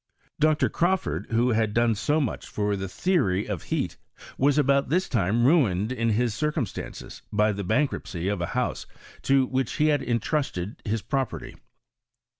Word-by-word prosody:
Dr. 155 0 +3
Crawford, 170 - 0
who 115 +2 +2
had 110 -2 +1
doDe 115 -1 +3
so 145 +9 +1
much 135 -7 -3
for 105 -1 -1
the 95 -1 -4
theory 105 - +1
of 100 -7 -3
heat, - - -2 0.4
was 140 +2 +2
about 140 -1 +3
this 180 +5 +1
time 115 +1 +1
ruined 115 - +3
iu 115 -2 -1
his 115 +1 +1
circumstances 150 - -4
by 105 0 +2
[he 100 - -4
bank 110 +10 +1
ruptcy 85 0 -5
of 100 -3 -1
a 85 - -1
house - - -1 0.3
to 135 -1 +3
which 130 +1 -1
he 155 0 +2
had 145 -2 +2
intrusted 115 - -2
his 110 -1 -2
property. 135 -3 -3
115 Hz, 165 wpm, -26 LUFS, 105-145 Hz, 0.4 s, Dr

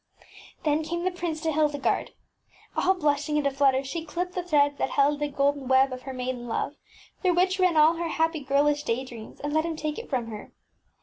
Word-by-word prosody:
Then 300 0 +2
came 340 +2 -3
the 370 - +1
prince 345 -3 -4
to 320 -1 0
Hildegarde. 295 -2 0 0.6
All 380 +1 +3
blush 295 -3 0
ing 300 - +1
and 295 - 0
aflutter, 275 -1 +3
she 320 +5 -4
clipped 355 +3 -4
the 365 - -2
threads 290 -5 +2
that - - 0
held 285 +1 +2
the 295 - 0
golden 280 -1 0
web 265 0 +4
of 255 - -7
her - - -3
maiden 250 -1 -4
love, 230 - -2 0.5
through 365 -3 +2
which 370 +2 +2
ran 365 -3 +3
all 315 +2 +6
her 340 0 -2
happy 325 0 0
girlish 290 +1 +2
day 260 -2 -2
dreams, 230 -4 -11
and 290 +1 -3
let 315 0 +3
him 330 -1 -3
take 305 +2 -3
it 465 - -9
from 255 -4 -1
her. 210 -1 -9
295 Hz, 220 wpm, -26 LUFS, 275-330 Hz, 0.6 s, all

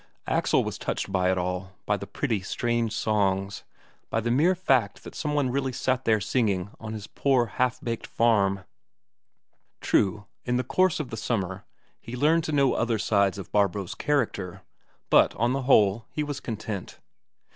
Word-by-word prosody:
Axel, - - +2
was - - -5
touched - - -3
by 95 -1 +2
it 95 - 0
all, 90 +1 -3
by 105 - +2
the 100 0 -7
pretty, 115 -9 -1
strange 120 +3 -1
songs, 100 -2 0 0.5
by 115 - 0
the 115 +1 -1
mere 160 +9 +4
fact 130 - +1
that - - -9
some 150 -1 -2
one 140 -4 +1
really 135 0 -1
sat 130 +1 -1
there 110 -1 +3
singing 100 -3 0
on 110 -1 -6
his 105 -2 -6
poor 130 0 +1
half 125 +2 -1
baked 115 -5 -4
farm. 100 -4 +2 1.2
True, 105 +1 +1 0.2
in 125 0 0
the 125 - 0
course 160 +7 +2
of 145 -5 -4
the 115 - -4
summer 95 -4 -2 0.3
he 120 - -8
learned 155 +6 +3
to - - -2
know 140 -3 +3
other 115 -1 0
sides 100 -3 +2
of 100 - -8
Barbro's 100 -2 +1
character, 100 -10 -1 0.5
but - - +5
on 120 +3 +1
the 135 - -1
whole, 105 -2 +4
he 150 - -2
was 145 -2 -4
content. 110 -4 -5
115 Hz, 175 wpm, -26 LUFS, 100-130 Hz, 1.2 s, but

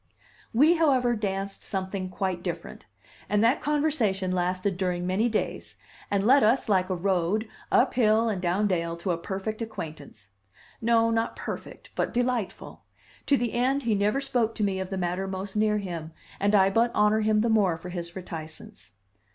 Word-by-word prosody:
We, 305 +9 +5
however, 260 -7 +3
danced 195 -2 -3
something 190 -1 -3
quite 185 -1 -2
different, 170 - -6 0.4
and 210 +1 +2
that 240 +6 +3
conversation 275 -11 +1
lasted 185 +2 0
during 180 -1 -1
many 195 +6 +1
days, 220 - -3 0.3
and 200 0 +1
led 270 +4 +6
us, 230 +5 +3
like 190 -3 +2
a 185 - 0
road, 190 +4 0 0.2
up - - +4
hill 225 -1 +3
and 200 -5 -1
down 185 +4 +1
dale 170 -3 -1
to 175 +2 -2
a 170 - 0
perfect 195 +5 -4
acquaintance. 150 - -8 0.5
No, 230 0 +3
not 225 0 0
perfect, - - -7
but - - -2
delightful; 245 -4 -2 0.5
to 280 - +4
the 240 -2 -2
end 260 +3 +1
he 230 -2 +1
never 210 +6 +1
spoke 245 -5 0
to 215 - -1
me 195 -2 0
of 190 -1 -4
the 195 - -3
matter 180 +1 -2
most 190 +1 -5
near 210 0 +2
him, 170 -5 -5 0.3
and 205 +1 +2
I 195 -1 +5
but 230 +4 +3
honor 210 +1 +4
him 215 0 +3
the 230 - +1
more 200 -7 +3
for 180 +2 -9
his 170 -1 -6
reticence. 160 - -8
200 Hz, 175 wpm, -27 LUFS, 185-230 Hz, 0.5 s, led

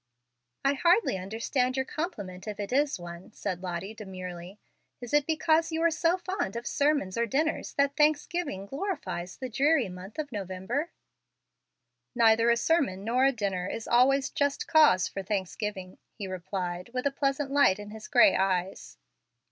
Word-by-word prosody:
"I 275 - +4
hardly 345 - +3
understand 230 +7 -1
your 265 - 0
compliment, 210 - -5
if 210 -1 -5
it 205 +4 -4
is 285 -4 +2
one," 175 +2 -9
said 180 -1 -4
Lottie, 185 +3 -4
demurely. 185 -3 -8 0.4
"Is 245 +1 -8
it 295 -1 +3
because 320 +1 +2
you 320 - -1
are 335 - +4
so 330 +2 +2
fond 370 - -3
of 235 +1 -5
sermons 285 -9 +1
or 235 - +1
dinners 310 +8 -1
that 280 0 +2
Thanksgiving 300 - +1
glorifies 275 - -4
the 260 - -5
dreary 270 -1 +2
month 180 +3 -10
of 300 -3 -4
November?" 205 - -3 1.3
"Neither 230 -1 +5
a 235 - +4
sermon 250 - +1
nor 245 +4 +2
a 275 - +5
dinner 200 -6 -2
is 225 - -5
always 265 +3 +3
a - - -36
just 285 -2 0
cause 300 - +5
for 195 - -5
Thanksgiving," 190 -1 -4 0.2
he 205 - -5
replied, 180 0 -4
with 250 - -2
a 280 - +2
pleasant 275 0 -1
light 280 -9 +4
in 205 0 -9
his 220 0 -9
gray 290 +3 +6
eyes. 190 -1 -1
235 Hz, 165 wpm, -28 LUFS, 190-290 Hz, 1.3 s, gray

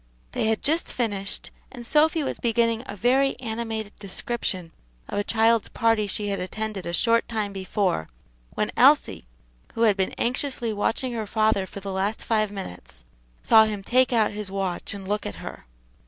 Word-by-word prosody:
They - - 0
had 220 -1 0
just 320 +4 +1
finished, 205 -5 -2 0.2
and 245 -3 -9
Sophy 310 +4 +3
was - - -3
beginning 230 -1 +1
a 200 - -6
very 260 +7 +2
animated 220 -3 -4
description 195 -3 -3 0.4
of - - -2
a - - +1
child's 225 +1 +3
party 225 -2 +2
she 205 +1 -2
had 195 -1 -1
attended 205 +1 -4
a - - -2
short 230 +6 +2
time 215 -3 -2
before, 190 - -1 0.5
when - - 0
Elsie, - - +4 0.5
who 230 - +1
had 215 -3 +5
been 190 -1 -1
anxiously 245 -2 -1
watching 225 +5 0
her 220 -2 -3
father 215 -3 +2
for 200 - -9
the 195 0 -5
last 195 +3 -1
five 215 -2 +1
minutes, 90 - -8 0.4
saw 220 -1 +7
him 210 -2 -4
take 255 +5 +3
out 225 -3 +3
his 210 -1 -6
watch 195 +1 -3
and 195 -1 -8
look 210 +1 -1
at 100 - -5
her. - - -9
215 Hz, 175 wpm, -25 LUFS, 195-230 Hz, 0.5 s, saw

